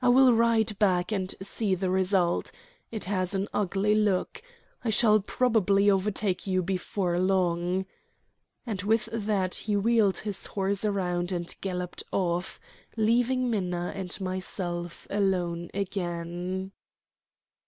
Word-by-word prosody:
"I 250 - +5
will 255 0 +6
ride 225 -2 +2
back 185 -2 +2
and 190 -3 -1
see 200 0 -1
the 185 0 -1
result. 185 -2 +1 0.4
It 220 -2 -5
has 185 0 0
an 195 +1 -1
ugly 200 +1 +1
look. 210 - +1 0.4
I 235 - -1
shall 215 0 +5
probably 205 -2 +2
overtake 195 -1 0
you 185 -1 +1
before 180 -1 -1
long," 180 0 +1 0.8
and 210 -6 -3
with 220 +3 +1
that 205 -4 0
he 210 -2 0
wheeled 215 -2 +3
his 205 -2 0
horse 195 0 0
round 180 -3 -1
and 175 -1 -3
galloped 180 -2 -4
off, 175 -1 -1 0.4
leaving 245 +3 +2
Minna 180 -4 -1
and 190 0 -4
myself 180 -2 -3
alone 180 -4 0
again. 180 -1 -3
195 Hz, 125 wpm, -28 LUFS, 180-210 Hz, 0.8 s, will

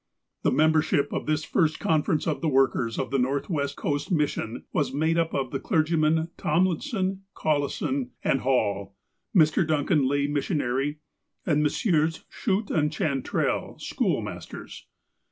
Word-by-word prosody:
The - - +2
membership 155 -1 +2
of - - -3
this 155 0 +1
first 155 -3 +1
conference 155 -1 +1
of 150 -5 -1
the 160 - +1
workers 130 -4 +2
of - - -2
the 135 - +2
Northwest 140 +2 -1
Coast 145 +1 -2
Mission 145 -7 -1
was 140 -4 +1
made 160 +4 +1
up 165 -1 0
of 130 -2 -1
the - - -2
clergymen 160 -2 +1
Tomlinson, 185 - 0
Collison, 155 - -1
and 135 - +1
Hall, 100 -7 0 0.4
Mr. 155 +1 +5
Duncan, 150 -2 +2
lay 140 +1 +1
missionary, 145 -1 -1 0.5
and 150 -2 +2
Messrs. 160 +1 +1
Schutt 205 -1 -1
and 150 -2 +1
Chantrel, 140 -4 -1
school - - 0
masters. - - -8
150 Hz, 135 wpm, -26 LUFS, 140-160 Hz, 0.5 s, Mr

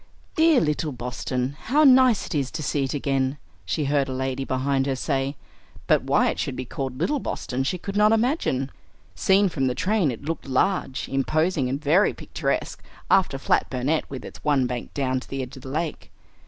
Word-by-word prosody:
"Dear 320 -4 +5
little 150 0 0
Boston! 125 +1 -3
How 295 +6 +3
nice 255 -5 +6
it - - -6
is 140 -4 0
to 155 0 -4
see 140 -1 0
it 135 - -3
again!" 135 -1 0 0.3
she 115 - -1
heard 140 -1 +1
a - - -3
lady 130 +1 -2
behind 135 +1 0
her 135 - 0
say; 135 +1 -1 0.5
but - - +3
why - - +2
it - - -7
should 135 - -2
be 130 - -4
called 130 -1 -5
"little 290 - +1
Boston" 130 - -3
she 160 +7 -1
could 195 +3 -6
not 210 +1 +5
imagine. 225 - +1 0.4
Seen 195 +1 +3
from 135 -7 -1
the 125 - -1
train, 190 - +1
it 125 +3 -6
looked 160 -2 -4
large, 140 0 0
imposing, 150 +1 0
and 135 +2 -2
very 160 +8 +3
picturesque, - - -3 0.3
after 180 -8 +3
flat 135 - +1
Burnet 135 +5 -1
with 130 -3 -7
its - - -11
one 140 -4 +2
bank 125 -1 -4
down 130 -2 0
to - - -14
the 135 -1 -3
edge 125 - -9
of 130 - -11
the 130 - -9
lake. 155 +3 -3
140 Hz, 200 wpm, -24 LUFS, 130-175 Hz, 0.5 s, nice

